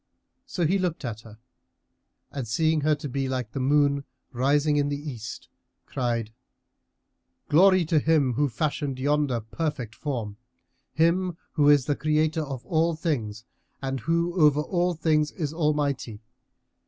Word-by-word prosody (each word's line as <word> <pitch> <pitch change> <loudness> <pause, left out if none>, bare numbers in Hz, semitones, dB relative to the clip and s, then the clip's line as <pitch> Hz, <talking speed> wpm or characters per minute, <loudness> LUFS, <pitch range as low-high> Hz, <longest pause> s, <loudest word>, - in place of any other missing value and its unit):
So 175 - -1
he 190 +5 +2
looked 175 -5 -2
at 110 -2 -5
her 110 -2 -14 0.9
and 135 -4 -5
seeing 155 +7 +1
her 155 +1 +3
to 145 0 -6
be 135 0 -2
like 125 -4 -3
the 135 - -4
moon 140 +1 +2 0.3
rising 145 +4 +2
in 145 0 +1
the 145 - -2
East, 130 -5 -7 0.4
cried, 115 -3 -2 1.2
"Glory 185 +3 +5
to 160 -1 +2
Him 150 -4 +2
who 145 +4 +1
fashioned 140 +2 -2
yonder 140 -3 +1
perfect 125 0 -4
form, 115 -7 -4 0.5
Him 170 +4 +1
who 145 -2 +3
is 145 -3 +5
the 145 - 0
Creator 155 +2 +1
of 135 -4 -6
all 165 -1 +1
things 120 - -3 0.3
and 135 -1 -3
who 170 +5 0
over 150 -1 +5
all 175 +2 0
things 155 -1 +1
is 155 -4 -3
Almighty! 145 -8 -1
145 Hz, 145 wpm, -26 LUFS, 130-160 Hz, 1.2 s, Glory